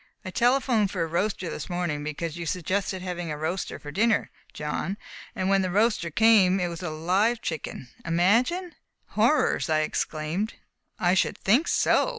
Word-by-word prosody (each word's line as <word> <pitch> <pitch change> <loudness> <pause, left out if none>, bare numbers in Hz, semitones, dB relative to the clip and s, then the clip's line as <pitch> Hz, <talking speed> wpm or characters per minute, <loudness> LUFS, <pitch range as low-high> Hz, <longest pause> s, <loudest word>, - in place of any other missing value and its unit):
I 185 - -5
telephoned 240 -2 +2
for 180 -3 -1
a - - 0
roaster 180 +3 -1
this - - -6
morning, 175 -5 -2
because 150 +2 -4
you 170 -1 -5
suggested 185 +2 -2
having 175 -2 -4
a 150 - -3
roaster 165 +5 -3
for 145 - -9
dinner, 215 +6 +1 0.2
John, 155 +6 -3 0.4
and 185 - -1
when 195 0 +3
the 185 - -1
roaster 210 -2 +2
came 195 0 +5
it 175 -1 0
was 170 0 -7
a 175 - -3
live 185 +9 +1
chicken! 160 - -5 0.2
Imagine!" 235 - +2 0.4
"Horrors!" - - +2
I 155 -1 +3
exclaimed. 155 +6 -2 0.4
"I 175 0 +3
should 190 - +1
think 245 - +3
so!" - - +3
185 Hz, 165 wpm, -26 LUFS, 165-210 Hz, 0.4 s, came